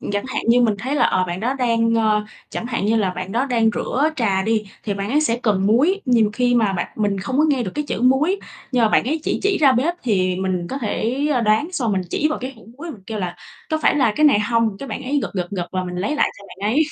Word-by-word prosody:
Ừm, - - -5
chẳng 205 +2 -1
hạn 260 - -3
như 245 +1 +5
mình 220 -3 +3
thấy 260 +7 -3
là, 290 - +3
ờ, 185 - +2
bạn 175 +2 -4
đó 250 +4 0
đang, 230 -3 +1
ờ 215 -2 +2 0.3
chẳng 235 - -4
hạn 230 -5 -2
như 225 +2 +2
là 195 -4 +1
bạn 185 +1 -6
đó 240 +4 +1
đang 230 -3 +2
rửa 290 +5 0
trà 195 -6 +1
đi 220 0 0 0.2
thì 205 -2 -1
bạn 200 +2 -4
ấy 295 +2 +3
sẽ 235 -6 +1
cần 200 -3 +1
muối, 295 - +3
nhiều 230 -5 +3
khi 245 +2 +1
mà 220 -5 +2
bạn 175 - -2
mình 205 -2 0
không 260 +7 -2
có 310 - +5
nghe 270 -4 +1
được 190 - -4
cái 295 - -2
chữ - - -2
muối, 285 +10 +3 0.3
nhưng 245 - +2
mà - - +4
bạn - - +3
ấy 305 +6 -1
chỉ - - -1
chỉ 400 -1 +2
ra 280 -4 +5
bếp, 300 +9 +1
thì 185 -6 +1
mình 185 -2 -2
có 270 - -3
thể, 245 +4 -1
ờ, 250 - +2
đoán 220 +6 +2
xong 235 - -1
mình 190 -1 0
chỉ 305 - +1
vào 310 - -2
cái 255 +2 -5
hũ 220 - -17
muối 340 +2 -6
mình 220 -10 -11
kêu 220 -1 -4
là 175 -2 -4 0.3
"Có 315 - +1
phải - - +4
là 255 -7 +2
cái 305 - +3
này 240 -8 +4
hông?" 230 -1 +1
cái 275 - -7
bạn 260 - -5
ấy 280 +3 0
gật, - - -3
gật, 180 -3 -2
gật 180 -2 -5
là 185 - -1
mình 180 0 -6
lấy 200 +12 -1
lại - - +3
cho 200 - -14
bạn 200 +3 -3
ấy, 300 - +4
230 Hz, 295 wpm, -21 LUFS, 200-265 Hz, 0.3 s, như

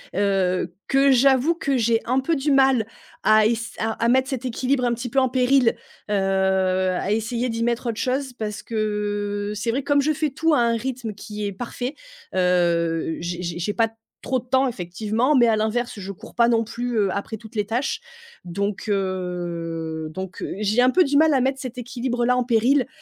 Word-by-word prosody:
heu, 190 -3 +1 0.2
que 275 0 +4
j'avoue 265 +5 +4
que 280 -4 -1
j'ai 230 -2 +2
un 255 +2 +2
peu 315 +5 0
du 290 +2 0
mal 265 -5 +4 0.4
à 215 0 +5
ess 230 0 -2
à 220 +1 -1
mettre 260 +2 +3
cet 260 -2 -4
équilibre, 250 +1 0
un 240 - +2
petit 240 +1 -4
peu, 275 - -6
en 260 -1 +2
péril, 255 -1 +3 0.4
heu, - - +2
à 190 -1 +1
essayer 230 +3 -1
d'y 230 0 -2
mettre 235 +1 -1
autre 225 - -3
chose 260 0 -1
parce 215 -3 -5
que, 205 -2 -2
c'est 220 +3 -1
vrai, 270 - -1
comme 285 +1 +2
je 310 +2 +1
fais 305 0 -1
tout 320 +4 +1
à 290 - +4
un 235 -1 +2
rythme 240 -3 -4
qui 210 0 -5
est - - -3
parfait, 245 +5 -5 0.4
heu, 170 -3 +1
j'ai 175 +1 -4
j'ai 170 -1 -4
j'ai 190 +4 -2
pas 230 -1 +2
d 225 - -19 0.3
trop 260 0 0
de 250 - -15
temps, 260 +1 +2
effectivement, 220 - -1
mais 240 -2 +5
à 225 - +3
l'inverse, 220 +3 -1
je 195 +1 -6
cours 225 +4 -12
pas 235 -1 +4
non 230 -1 +3
plus, 235 +1 -4
heu, 200 -2 +2
après 210 +2 -4
toutes 220 +1 -14
les 210 -1 0
tâches 240 +5 -1 0.4
donc 200 +5 -3
heu, 175 -4 -3
donc 190 +2 -6 0.2
j'ai 215 +3 +2
un 250 - +5
peu 365 +8 +4
du 285 -2 +1
mal 310 0 +5
à - - +4
mettre 265 +1 0
cet 255 -1 -7
équilibre-là 245 0 -1
en 250 - +1
péril 245 +3 +2
230 Hz, 205 wpm, -23 LUFS, 200-255 Hz, 0.4 s, à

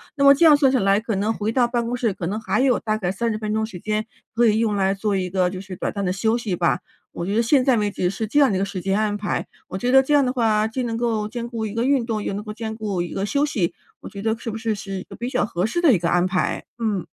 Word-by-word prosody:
那 280 - 0
么 280 - +9
这 290 +4 +3
样 295 - +7
算 275 -3 +4
下 260 - +2
来， 195 +1 +3
可 220 -1 -3
能 205 +3 0
回 215 0 -2
到 240 0 +3
办 240 -1 -1
公 240 - -2
室， 235 -3 0
可 180 - -5
能 200 +5 -2
还 205 +2 0
有 265 -2 +3
大 215 -1 -1
概 180 -4 -1
30 225 +2 -1
分 215 -1 -3
钟 220 - 0
时 180 -5 -9
间， 215 +2 -2 0.3
可 235 +1 +3
以 215 - +3
用 220 -2 +1
来 195 0 +1
做 205 +1 -1
一 185 -1 -1
个 185 -1 +1
就 185 0 -6
是 195 -1 -8
短 - - -3
暂 200 -1 -3
的 180 - 0
休 220 +4 +1
息 205 -6 -2
吧， 170 0 +1 0.3
我 170 - -5
觉 200 +4 -2
得 230 - +3
现 260 +3 +3
在 255 -2 +3
为 210 -1 0
止， 180 -2 -1
是 210 +3 -3
这 230 +7 +1
样 280 -3 +5
的 195 - 0
一 - - 0
个 195 - +1
时 190 -2 -5
间 195 +3 0
安 210 -1 0
排。 210 0 -2 0.2
我 185 - -5
觉 245 +6 0
得 265 - +7
这 290 +3 +1
样 285 -2 +4
的 250 - 0
话， 220 -3 +2
既 255 +4 -3
能 230 -2 -2
够 225 -3 -1
兼 235 0 -5
顾 225 -2 -3
一 205 - -7
个 230 - 0
运 270 -3 +2
动， 220 -3 -3
又 - - -3
能 205 +1 -4
够 215 - -7
兼 220 0 -5
顾 205 -5 -2
一 175 - -6
个 195 +1 -2
休 285 +6 +1
息， 195 - -1 0.3
我 - - -8
觉 200 0 -8
得 220 0 +1
是 230 - -5
不 220 - -4
是 225 -1 -1
是 195 -1 -7
一 - - -8
个 - - -12
比 240 +2 -4
较 - - +1
合 185 0 -1
适 345 - -2
的 300 -8 +6
一 180 - +2
个 170 - 0
安 175 0 +3
排？ 185 0 -1
嗯。 210 -6 -1
215 Hz, 350 characters per minute, -22 LUFS, 195-235 Hz, 0.3 s, 么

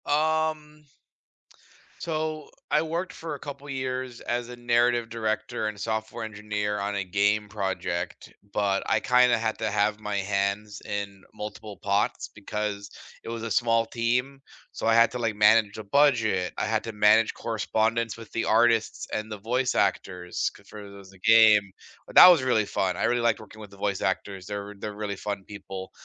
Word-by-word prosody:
Um 155 0 0 1.2
So 155 -2 -3 0.2
I 150 - +4
worked 170 +3 -3
for 160 -2 -6
a - - -10
couple 145 0 -9
years 130 -2 -4
as 120 0 -3
a 125 - -7
narrative 120 0 +2
director 110 -1 -2
and 105 -1 -5
software 110 +1 -3
engineer 105 -1 -3
on 100 +1 -2
a 100 - -1
game 100 +3 +1
project, 95 -3 -4 0.2
but 100 -1 +1
I 110 - +3
kinda 125 +1 +4
had 110 -1 -2
to 110 -1 -1
have 105 +1 +1
my 105 -1 -4
hands 100 +1 -2
in 100 -2 -5
multiple 105 -1 -8
pots 100 0 0
because 105 -1 -5 0.3
it - - -7
was 115 -1 -5
a 115 - -4
small 115 +1 +2
team. 125 +4 -1 0.3
So, - - -3
I 115 - +4
had 115 0 +5
to, 125 - -5
like, 115 -3 -1
manage 105 0 +4
a 110 - -6
budget, 110 -7 +2
I - - -1
had 110 0 -1
to 115 - -5
manage 105 +2 +4
correspondence 115 0 -1
with 115 -2 -12
the 115 - -1
artists 115 0 +2
and 110 0 -3
the 105 - -5
voice 125 +5 -1
actors 90 -2 -1
c - - -17
for 105 - -11
those 100 -1 -12
in 95 - -19
the 110 - +4
game, 105 -3 +6 0.4
but - - -13
that - - +12
was 170 -6 +4
really 120 -5 +2
fun. 95 -2 -1
I - - -3
really 120 - +2
liked 115 -1 +1
working 110 +1 -14
with 105 - -10
the 100 - -16
voice 100 -2 -1
actors, 95 0 -2
they're 100 0 -5
they're 105 0 -6
really 100 -1 -3
fun 100 -1 -4
people. 95 -2 -8
110 Hz, 185 wpm, -26 LUFS, 100-120 Hz, 1.2 s, that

